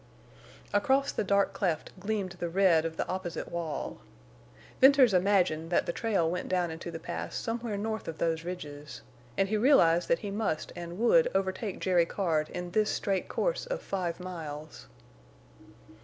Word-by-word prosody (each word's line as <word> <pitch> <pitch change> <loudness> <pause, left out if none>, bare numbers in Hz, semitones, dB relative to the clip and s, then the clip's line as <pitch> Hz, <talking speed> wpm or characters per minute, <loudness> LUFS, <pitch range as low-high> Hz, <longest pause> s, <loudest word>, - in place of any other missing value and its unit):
Across 265 +7 +2
the - - -1
dark 200 0 +2
cleft 175 -6 -1
gleamed 200 -1 -2
the 175 - -2
red 170 -3 +4
of 160 0 -4
the - - -1
opposite 185 -2 -4
wall. 170 -3 -4 0.8
Venters 265 -4 +7
imagined 180 -4 +2
that 175 - +2
the 170 - -2
trail 200 -7 +1
went 180 +2 -3
down 180 -2 +1
into 160 +1 -6
the 165 - -5
Pass 160 - -5
somewhere 230 -2 -3
north 220 +1 -3
of 160 - -5
those 165 -1 0
ridges. 150 -5 -7 0.3
And 195 - +3
he 215 - +1
realized 175 - +4
that 170 - +3
he 200 - -3
must 195 -7 -2
and 175 0 -7
would 485 - +4
overtake 190 +1 -1
Jerry 175 -3 +3
Card 160 -6 0
in 180 0 -5
this 215 +2 +2
straight 195 -2 -1
course - - -1
of - - -2
five 185 - -3
miles. 155 - -7
185 Hz, 165 wpm, -29 LUFS, 165-210 Hz, 0.8 s, Venters